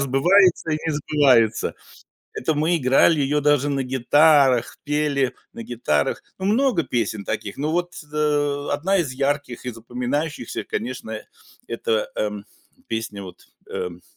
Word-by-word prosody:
сбывается 165 Hz, +6 st, +3 dB
и -, -, +2 dB
не 160 Hz, -, 0 dB
сбывается". 135 Hz, -7 st, +2 dB, 0.6 s
Это 155 Hz, +5 st, -1 dB
мы 160 Hz, +4 st, +2 dB
играли 145 Hz, +2 st, +4 dB
её 145 Hz, +2 st, +1 dB
даже 145 Hz, -1 st, +2 dB
на 135 Hz, -1 st, 0 dB
гитарах, 130 Hz, 0 st, +3 dB
пели 145 Hz, -3 st, 0 dB, 0.2 s
на 115 Hz, -, -8 dB
гитарах. 75 Hz, -12 st, -1 dB, 0.2 s
Ну, 190 Hz, -, -3 dB
много 225 Hz, -4 st, +2 dB
песен 110 Hz, -6 st, -2 dB
таких, 100 Hz, -, -4 dB
но 150 Hz, +2 st, -1 dB
вот, 175 Hz, 0 st, -1 dB, 0.2 s
э, 145 Hz, -1 st, 0 dB
одна 190 Hz, +7 st, +1 dB
из 145 Hz, -7 st, -1 dB
ярких 140 Hz, -2 st, -2 dB
и -, -, -1 dB
запоминающихся, 125 Hz, +4 st, -4 dB
конечно, 110 Hz, -2 st, -5 dB, 0.5 s
это, 115 Hz, -2 st, -1 dB
эм, 105 Hz, -1 st, -3 dB, 0.4 s
песня, 110 Hz, -3 st, -4 dB
вот, 90 Hz, -2 st, -12 dB, 0.2 s
эм 90 Hz, -1 st, -5 dB
140 Hz, 135 wpm, -22 LUFS, 120-150 Hz, 0.6 s, играли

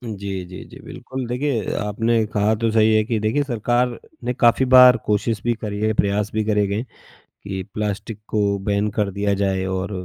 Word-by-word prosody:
जी, 95 Hz, -2 st, -5 dB
जी, 90 Hz, +1 st, -10 dB
जी, -, -, -12 dB
बिल्कुल। 130 Hz, -1 st, -7 dB
देखिए, 125 Hz, -1 st, -1 dB
आपने 115 Hz, +2 st, 0 dB
कहा 105 Hz, +1 st, +2 dB
तो 115 Hz, +1 st, 0 dB
सही 110 Hz, 0 st, +4 dB
है 110 Hz, -, +3 dB
कि 115 Hz, -1 st, -1 dB
देखिए 110 Hz, +7 st, 0 dB
सरकार 120 Hz, -1 st, 0 dB, 0.3 s
ने 125 Hz, +1 st, -1 dB
काफ़ी 120 Hz, +2 st, +3 dB
बार 125 Hz, -1 st, +9 dB
कोशिश 105 Hz, +1 st, 0 dB
भी 120 Hz, 0 st, +1 dB
करी 105 Hz, -1 st, -4 dB
है, 110 Hz, +1 st, +1 dB
प्रयास 100 Hz, 0 st, 0 dB
भी 110 Hz, 0 st, 0 dB
करे 105 Hz, -1 st, +2 dB
गए, 100 Hz, +4 st, -2 dB, 0.4 s
कि 95 Hz, -1 st, -8 dB
प्लास्टिक 105 Hz, 0 st, -4 dB
को 100 Hz, -2 st, 0 dB
बैन 100 Hz, +1 st, +1 dB
कर 105 Hz, -2 st, +1 dB
दिया 100 Hz, +1 st, -1 dB
जाए 95 Hz, -1 st, 0 dB
और 95 Hz, +1 st, -3 dB
105 Hz, 190 wpm, -21 LUFS, 100-115 Hz, 0.4 s, बार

